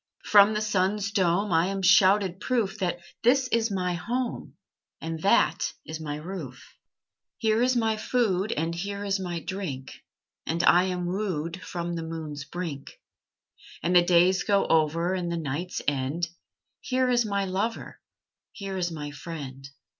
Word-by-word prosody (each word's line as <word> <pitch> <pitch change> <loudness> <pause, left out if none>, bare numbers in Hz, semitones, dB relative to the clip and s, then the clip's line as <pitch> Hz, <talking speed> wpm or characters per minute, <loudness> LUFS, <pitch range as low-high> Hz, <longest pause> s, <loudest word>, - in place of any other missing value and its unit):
From 205 +1 +6
the 210 - 0
sun's 200 0 0
dome 195 0 +1
I 165 +2 +3
am 195 0 -3
shouted 190 0 +5
proof 215 -4 -1
That 175 -3 -1 0.2
this 260 +2 +4
is 230 -1 +1
my 180 -3 -1
home, 240 +7 -3 0.4
And 160 0 -5
that 195 - +2
is 160 0 -6
my 150 -2 -4
roof. 150 -5 -8 0.6
Here 220 0 +2
is 255 +1 +3
my 225 -2 +1
food, 215 -3 0
And 165 +2 -1
here 200 +4 -4
is 195 0 0
my 175 -2 -3
drink, 160 -10 -5 0.6
And 170 +1 0
I 180 +1 +6
am 180 -1 -2
wooed 180 -2 -3
From 175 -1 -4
the 165 - -3
moon's 160 -3 -6
brink. 160 -4 -6 0.8
And 175 +2 +1
the 175 - +9
days 180 +2 +4
go 200 -1 +2
over, 165 +3 +2
And 175 -2 -2
the 170 - -1
nights 165 +3 -3
end; 145 +5 -1 0.5
Here 255 0 0
is 240 -1 +3
my 200 -2 -1
lover, 200 +5 -3 0.5
Here 195 -2 -5
is 175 -2 -1
my 150 -2 -5
friend. 140 -3 -8
180 Hz, 155 wpm, -27 LUFS, 165-205 Hz, 0.8 s, the